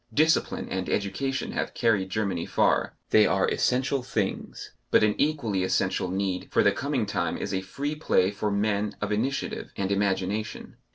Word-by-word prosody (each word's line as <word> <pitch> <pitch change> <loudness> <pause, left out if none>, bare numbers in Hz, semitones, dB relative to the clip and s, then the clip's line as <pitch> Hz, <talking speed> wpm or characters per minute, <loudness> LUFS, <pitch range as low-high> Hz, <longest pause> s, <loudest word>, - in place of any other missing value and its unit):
Discipline 155 +7 +2
and 95 -1 -3
education 135 +7 -1
have - - -3
carried 105 -6 +2
Germany 95 -4 -1
far; - - +2 0.2
they - - +6
are - - +2
essential 130 +2 +1
things, 110 -6 -3 0.2
but - - +5
an 105 -1 +4
equally 140 -10 +1
essential 95 0 0
need 95 -1 -2
for - - +3
the 100 - +5
coming 135 +1 -1
time 90 -5 -1
is 100 - -4
a 95 - 0
free 140 +10 -4
play 100 -10 +2
for 105 +1 -2
men 105 0 0
of 105 0 -2
initiative 130 +6 -2
and 95 0 -1
imagination. 100 +1 -1
105 Hz, 165 wpm, -27 LUFS, 95-125 Hz, 0.2 s, they